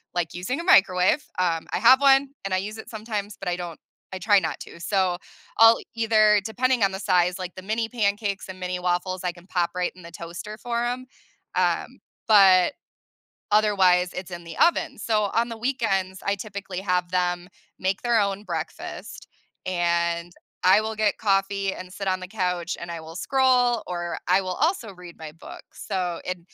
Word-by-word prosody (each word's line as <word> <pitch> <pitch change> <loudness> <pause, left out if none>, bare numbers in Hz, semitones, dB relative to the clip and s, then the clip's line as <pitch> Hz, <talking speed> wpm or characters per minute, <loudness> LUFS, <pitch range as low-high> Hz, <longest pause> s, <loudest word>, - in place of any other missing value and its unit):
like 170 -2 -1
using 185 - -3
a - - -4
microwave, 190 - +4 0.2
um, 165 -3 0
I - - 0
have 260 +4 +6
one 275 0 +5 0.2
and 190 - -2
I - - +3
use 210 +3 -4
it - - -10
sometimes, 215 -2 -5
but - - -3
I 175 - 0
don't 175 -2 -7 0.3
I - - -3
try 205 +1 +4
not - - -4
to. - - -10
So, 185 -1 0 0.4
I'll 225 0 +8 0.2
either 215 -2 +4
depending 250 +1 +1
on 195 - +3
the 190 - -5
size, 180 -2 +2
like, 180 -1 -5
the 185 - -8
mini 225 +2 -1
pancakes 205 -4 -1
and 185 0 -8
mini 180 0 -3
waffles, 180 +1 -1
I 180 - 0
can 175 0 -17
pop 175 -3 0
right 180 0 -1
in 180 - -14
the 170 - -11
toaster 170 +6 -8
for 235 0 -2
'em, 250 +1 -3 0.5
um, - - 0 0.3
but 195 +1 +6 0.8
otherwise 190 -4 +4
it's 185 0 -6
in 175 -1 -7
the 165 -1 -9
oven. 345 - +2
So, 215 -2 +1
on 235 +1 +2
the 230 - -5
weekends, 195 -7 -1
I 200 0 +1
typically 195 -2 -6
have 180 -2 0
them 180 0 0 0.3
make 190 +1 -1
their 235 -2 +3
own 200 +1 -1
breakfast - - -6 0.4
and 170 -1 0 0.3
I 185 +3 +6
will 220 0 -3
get 215 -1 +1
coffee 195 -1 +1
and 185 0 -9
sit 195 +1 -4
on 185 0 0
the 185 - -7
couch 180 -4 -2
and 170 0 -7
I 165 -1 -5
will 160 +2 -10
scroll, 250 -1 +2
or 175 -1 -4
I 185 +2 +4
will 185 -1 -3
also 315 - 0
read 180 -1 -12
my 160 -1 -8
books. 165 - -12
So, 180 -3 -2
it 185 0 -3
190 Hz, 190 wpm, -24 LUFS, 180-220 Hz, 0.8 s, I'll